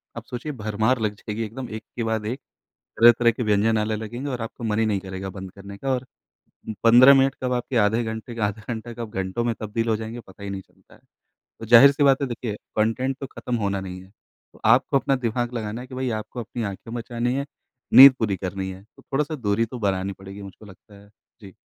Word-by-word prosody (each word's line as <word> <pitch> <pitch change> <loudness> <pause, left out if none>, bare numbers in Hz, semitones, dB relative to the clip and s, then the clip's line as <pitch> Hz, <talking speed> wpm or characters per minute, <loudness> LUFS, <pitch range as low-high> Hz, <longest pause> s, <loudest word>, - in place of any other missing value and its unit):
अब - - -7
सोचिए 125 +5 -5
भरमार 110 0 0
लग 105 -2 -1
जाएगी 105 +2 -5
एकदम 120 +4 -6
एक 110 - -7
के 120 - -2
बाद 110 -1 -1
एक 125 +6 -3 0.6
तरह-तरह 120 0 +7
के 115 +2 -4
व्यंजन 110 +1 +2
आने 105 0 -1
लगेंगे 120 +6 -5
और 125 - -4
आपको 115 +1 -7
मन 105 -1 0
ही 110 - +2
नहीं 100 -3 0
करेगा 95 0 -6
बंद 95 0 -8
करने 100 0 -11
का 135 - -3
और 130 0 -2 0.8
15 125 +4 +8
मिनट 135 0 +3
कब 125 -1 -1
आपके 125 +1 -2
आधे 115 +3 +1
घंटे 110 +1 -6
का 110 -3 0
आधा 105 +1 -5
घंटा 115 +2 -7
कब 115 -2 -6
घंटों 95 +6 -3
में 120 - 0
तब्दील 115 +2 -2
हो 110 - +2
जाएँगे 110 +2 -6
पता 95 -2 -16
ही 100 - -5
नहीं 95 -1 -5
चलता - - -25
है। - - -21 0.6
तो 115 - -7
ज़ाहिर-सी 135 +5 +7
बात 135 0 +4
है 140 - 0
देखिए 115 -3 -4 0.2
कंटेंट 125 +5 0
तो 135 - -5
खत्म 125 -1 -4
होना 100 -2 -1
नहीं 90 -1 -7
है। 95 - -16 0.4
तो - - -19
आपको 130 +5 +4
अपना 135 - +1
दिमाग 120 +2 -2
लगाना 110 0 -4
है 125 - -10
कि 130 - -9
भई 130 0 -2
आपको 120 - -8
अपनी 115 +1 -5
आँखें 100 +3 -6
बचानी 120 +1 -2
है, 140 +1 -2 0.5
नींद 135 +1 +11
पूरी 105 -4 0
करनी 95 +1 -4
है 95 +1 -11
तो 110 - -22
थोड़ा-सा 150 +3 -2
दूरी 115 -3 0
तो 120 +2 -8
बनानी 95 -2 -1
पड़ेगी 95 +1 -11
मुझको 100 +2 -11
लगता 100 +1 -16
है। 100 - -19 0.3
जी। 95 -3 -13
115 Hz, 230 wpm, -24 LUFS, 105-125 Hz, 0.8 s, नींद